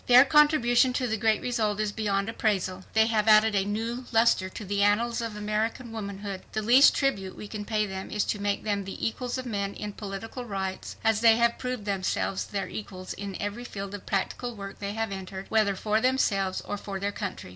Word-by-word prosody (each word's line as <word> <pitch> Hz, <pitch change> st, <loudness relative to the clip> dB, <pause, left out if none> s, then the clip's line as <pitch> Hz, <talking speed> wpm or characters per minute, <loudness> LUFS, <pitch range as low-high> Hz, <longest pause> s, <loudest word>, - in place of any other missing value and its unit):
Their 250 Hz, +2 st, +8 dB
contribution 265 Hz, -4 st, +4 dB
to 250 Hz, -, 0 dB
the 220 Hz, -2 st, 0 dB
great 220 Hz, 0 st, +2 dB
result 215 Hz, -4 st, 0 dB
is 215 Hz, -1 st, 0 dB
beyond 200 Hz, -2 st, -1 dB
appraisal. 190 Hz, -4 st, -1 dB
They 220 Hz, 0 st, +5 dB
have 220 Hz, -1 st, +1 dB
added 215 Hz, 0 st, +6 dB
a 195 Hz, -1 st, +2 dB
new 230 Hz, +4 st, -3 dB
luster 225 Hz, -5 st, +3 dB
to 210 Hz, -, -8 dB
the 200 Hz, +1 st, -1 dB
annals 230 Hz, +4 st, +2 dB
of 230 Hz, -2 st, -4 dB
American 215 Hz, +3 st, -2 dB
womanhood. 200 Hz, -3 st, -5 dB
"The 215 Hz, -, -1 dB
least 250 Hz, +6 st, +7 dB
tribute 195 Hz, -9 st, -1 dB
we 210 Hz, -, -7 dB
can 210 Hz, 0 st, -6 dB
pay 215 Hz, -1 st, 0 dB
them 190 Hz, -1 st, -6 dB
is 210 Hz, -, 0 dB
to 205 Hz, -, -2 dB
make 205 Hz, 0 st, -1 dB
them 205 Hz, -2 st, -1 dB
the 195 Hz, -, -3 dB
equals 245 Hz, +3 st, -3 dB
of 255 Hz, -, -5 dB
men 200 Hz, -4 st, -2 dB
in 210 Hz, -1 st, -5 dB
political 215 Hz, +5 st, -6 dB
rights, 195 Hz, -4 st, -4 dB
as 225 Hz, -1 st, +2 dB
they 225 Hz, -1 st, +7 dB
have 235 Hz, 0 st, +2 dB
proved 250 Hz, -4 st, -4 dB
themselves 195 Hz, -1 st, -1 dB
their 195 Hz, -2 st, -3 dB
equals 185 Hz, -1 st, -7 dB
in 200 Hz, -2 st, -6 dB
every 205 Hz, +3 st, -4 dB
field 200 Hz, -4 st, -6 dB
of 205 Hz, -, -8 dB
practical 230 Hz, +5 st, -2 dB
work 200 Hz, -1 st, -8 dB
they 200 Hz, 0 st, -4 dB
have 225 Hz, -1 st, -2 dB
entered, 190 Hz, 0 st, -6 dB
whether 215 Hz, -3 st, +2 dB
for 215 Hz, +3 st, 0 dB
themselves 200 Hz, -7 st, +1 dB
or 205 Hz, -, -4 dB
for 200 Hz, -1 st, -5 dB
their 200 Hz, +1 st, -1 dB
country. 200 Hz, -, -5 dB
210 Hz, 210 wpm, -27 LUFS, 200-230 Hz, -, Their